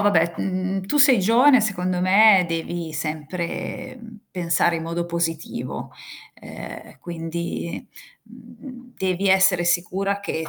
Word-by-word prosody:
vabbè, 170 -5 +3
mhmm, 190 0 -2
tu 295 - -1
sei 275 -5 +6
giovane, 245 +6 +5
secondo 185 -4 -1
me 190 0 +6
devi 165 -1 -4
sempre, 160 - -5
mhmm, 225 -1 -12
pensare 170 -1 +1
in 160 - -5
modo 170 +1 -3
positivo, 170 -2 -4 0.5
ehm, - - -10
quindi, 170 +1 -5 0.4
mhmm, 250 -2 -14
devi 190 +1 -1
essere 190 -2 +4
sicura 190 +3 0
che 160 -5 -4
180 Hz, 120 wpm, -22 LUFS, 170-200 Hz, 0.5 s, sei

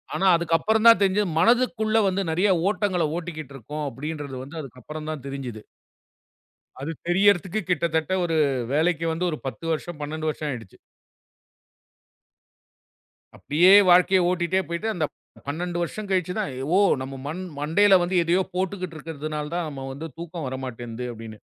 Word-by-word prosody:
ஆனா 195 - 0
அதுக்கப்புறம்தான் 215 +8 +4
தெரிஞ்சு 200 +1 +3
மனதுக்குள்ள 225 +1 +3
வந்து 195 +1 0
நிறைய 185 +5 +2 0.2
ஓட்டங்களை 190 -5 0
ஓட்டிக்கிட்டு 155 -5 -7
இருக்கோம் 150 +5 -5
அப்படின்றது 145 +1 -6
வந்து 145 +5 -11
அதுக்கப்புறம்தான் 150 +3 -7
தெரிஞ்சுது. 130 -6 -6 1.2
அது 140 +4 -4 0.2
தெரியறதுக்கு 190 +1 +3
கிட்டத்தட்ட 160 -1 0
ஒரு 165 -2 0 0.4
வேலைக்கு 165 +2 +1
வந்து 175 +2 -1
ஒரு 155 - -3
10 150 +5 -6
வருஷம், 160 +1 -3
12 155 +1 -3
வருஷம் 150 -1 -3
ஆயிடுச்சு. 115 -7 -7 2.6
அப்படியே 175 +6 +4 0.2
வாழ்க்கையை 180 +1 +6
ஓட்டிட்டே 180 +1 +1
போயிட்டு 170 +6 -3
அந்தப் 155 -4 -2 0.3
12 175 +4 -3
வருஷம் 205 +5 -4
கழிச்சுதான் 185 +1 0 0.3
ஓ - - +5 0.2
நம்ம 135 0 -6 0.4
மண்டையில 190 +6 +5
வந்து 180 +1 -1
எதையோ 175 +3 +2
போட்டுகிட்டு 185 -2 -3
இருக்கறதுனால 155 -1 -5
தான் 175 -2 -1
நாம 135 -2 -7
வந்து 155 +4 -6
தூக்கம் 170 -2 -6
வரமாட்டேங்குது 125 -2 -6
அப்படின்னு. 110 -1 -9
165 Hz, 130 wpm, -24 LUFS, 145-185 Hz, 2.6 s, வாழ்க்கையை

